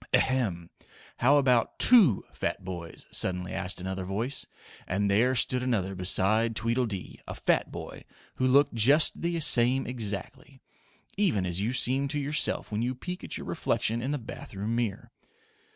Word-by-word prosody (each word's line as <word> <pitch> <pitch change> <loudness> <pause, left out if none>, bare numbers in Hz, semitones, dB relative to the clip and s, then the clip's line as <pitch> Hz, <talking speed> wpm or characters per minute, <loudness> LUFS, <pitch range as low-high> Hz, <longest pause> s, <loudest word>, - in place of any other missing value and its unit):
"Ahem! 100 -11 0 0.5
How 140 +4 +4
about 125 -5 +2
TWO 205 - +5
fat - - -4
boys?" 85 -3 -7
suddenly 90 -1 +1
asked 95 -1 -3
another 95 +1 -4
voice, 110 +8 -2 0.4
and 100 +2 0
there 120 +6 +3
stood 125 +1 +1
another 105 -7 -1
beside 100 +5 +1
Tweedledee, 115 -5 -2
a - - -6
fat - - 0
boy, - - -8 0.3
who 130 - +1
looked 140 +2 +4
just 135 +8 +4
the 170 0 -1
same 130 -3 +5
exactly; 115 +2 -6 0.6
even 165 - +1
as 90 +1 -2
you 110 +4 -1
seem 130 +2 +1
to 145 +1 -3
yourself 145 -3 -1
when 105 +1 -2
you 125 +2 -2
peek 180 +7 -7
at - - -3
your - - -8
reflection 115 +2 -1
in 130 - -3
the 145 - -1
bath 110 -4 -10
room 105 +4 -2
mirror. 115 -5 -3
115 Hz, 160 wpm, -28 LUFS, 95-130 Hz, 0.6 s, TWO